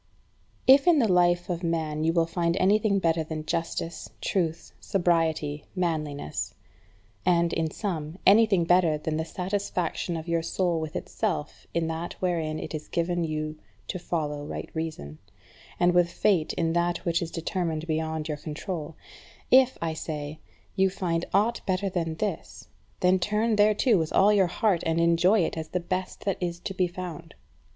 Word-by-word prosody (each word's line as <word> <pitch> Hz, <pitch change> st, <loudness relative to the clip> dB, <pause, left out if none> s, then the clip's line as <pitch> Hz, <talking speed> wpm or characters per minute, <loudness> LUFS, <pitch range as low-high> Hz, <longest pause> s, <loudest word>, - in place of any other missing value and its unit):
6. 270 Hz, +2 st, +9 dB
If -, -, -14 dB
in 345 Hz, -3 st, +6 dB
the 240 Hz, -6 st, +4 dB
life 175 Hz, -1 st, +3 dB
of 175 Hz, -3 st, -2 dB
man 160 Hz, -3 st, -1 dB
you 165 Hz, -, +3 dB
find 170 Hz, +1 st, 0 dB
anything 200 Hz, +2 st, +3 dB
better 165 Hz, -3 st, +1 dB
than 155 Hz, -1 st, -5 dB
justice, 165 Hz, +1 st, -3 dB
truth, 165 Hz, -4 st, -2 dB
sobriety, 160 Hz, -5 st, 0 dB
manliness; 155 Hz, -, -2 dB, 0.7 s
and, 170 Hz, -2 st, +3 dB
in 160 Hz, -1 st, 0 dB
sum, 160 Hz, -3 st, -4 dB
anything 205 Hz, -3 st, +6 dB
better 170 Hz, -2 st, +3 dB
than 155 Hz, +1 st, -2 dB
the 160 Hz, -, 0 dB
satisfaction 180 Hz, -1 st, -2 dB
of 160 Hz, +1 st, -7 dB
your 170 Hz, -1 st, +1 dB
soul 170 Hz, 0 st, 0 dB
with 160 Hz, -1 st, -5 dB
itself 160 Hz, -9 st, -3 dB
in 170 Hz, -1 st, +1 dB
that 165 Hz, +1 st, -4 dB
wherein 165 Hz, -4 st, -1 dB
it -, -, -6 dB
is 155 Hz, -1 st, -5 dB
given 175 Hz, +1 st, -1 dB
to 165 Hz, -, -1 dB
you 155 Hz, 0 st, -3 dB, 0.3 s
to 185 Hz, -, -3 dB
follow 150 Hz, -4 st, -2 dB
right 145 Hz, -, -6 dB
reason; 155 Hz, -, -5 dB, 0.6 s
and 175 Hz, 0 st, +4 dB
with 175 Hz, -1 st, +4 dB
fate 175 Hz, -4 st, +1 dB
in 165 Hz, -1 st, 0 dB
that 175 Hz, 0 st, 0 dB
which 170 Hz, -1 st, +1 dB
is 170 Hz, -, -3 dB
determined 165 Hz, -2 st, -2 dB
beyond 160 Hz, -1 st, -2 dB
your 150 Hz, -2 st, -3 dB
control; 155 Hz, +1 st, -5 dB, 0.6 s
if, 260 Hz, 0 st, +6 dB
I 165 Hz, -1 st, -1 dB
say, 155 Hz, -1 st, -5 dB, 0.4 s
you 190 Hz, -1 st, +3 dB
find 175 Hz, -3 st, -2 dB
aught 215 Hz, +5 st, +2 dB
better 190 Hz, +1 st, 0 dB
than 165 Hz, -3 st, -2 dB
this, 205 Hz, +4 st, -4 dB, 0.3 s
then 185 Hz, +1 st, +4 dB
turn 215 Hz, +4 st, +1 dB
thereto 210 Hz, +1 st, +4 dB
with 160 Hz, -1 st, -2 dB
all 205 Hz, +2 st, +5 dB
your 195 Hz, -3 st, +4 dB
heart, 190 Hz, 0 st, +1 dB
and 165 Hz, 0 st, 0 dB
enjoy 170 Hz, +5 st, +4 dB
it 165 Hz, -, -1 dB
as 160 Hz, -, -5 dB
the 180 Hz, -, -2 dB
best 185 Hz, +3 st, -4 dB
that 195 Hz, -2 st, -1 dB
is 175 Hz, -1 st, -2 dB
to 195 Hz, -, -4 dB
be 185 Hz, -1 st, +1 dB
found. 175 Hz, -3 st, -8 dB
170 Hz, 170 wpm, -27 LUFS, 160-185 Hz, 0.7 s, 6